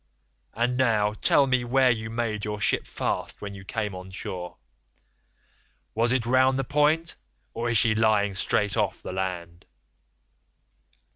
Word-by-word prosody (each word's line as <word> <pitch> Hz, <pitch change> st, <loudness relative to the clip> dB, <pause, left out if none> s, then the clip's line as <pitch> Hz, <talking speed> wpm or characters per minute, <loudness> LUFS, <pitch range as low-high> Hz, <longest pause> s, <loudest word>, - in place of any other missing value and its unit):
And 120 Hz, +2 st, 0 dB
now 110 Hz, -5 st, +2 dB
tell 140 Hz, +5 st, +3 dB
me 130 Hz, -2 st, +1 dB
where 130 Hz, +1 st, +3 dB
you 110 Hz, -2 st, -3 dB
made 110 Hz, -2 st, -3 dB
your 105 Hz, 0 st, -3 dB
ship 95 Hz, -, +1 dB
fast -, -, -3 dB
when 100 Hz, -1 st, -7 dB
you 100 Hz, 0 st, -10 dB
came 105 Hz, 0 st, -3 dB
on 90 Hz, 0 st, -9 dB
shore. 90 Hz, -1 st, -7 dB, 1.4 s
Was 115 Hz, +2 st, +1 dB
it 125 Hz, -2 st, +1 dB
round 130 Hz, +2 st, +3 dB
the 135 Hz, -, 0 dB
point, 150 Hz, +4 st, +1 dB, 0.4 s
or 120 Hz, +1 st, -2 dB
is 115 Hz, -, +2 dB
she 110 Hz, +1 st, +4 dB
lying 110 Hz, -2 st, +2 dB
straight 100 Hz, +1 st, 0 dB
off -, -, -1 dB
the -, -, -6 dB
land? 90 Hz, -2 st, -5 dB
110 Hz, 150 wpm, -26 LUFS, 100-125 Hz, 1.4 s, she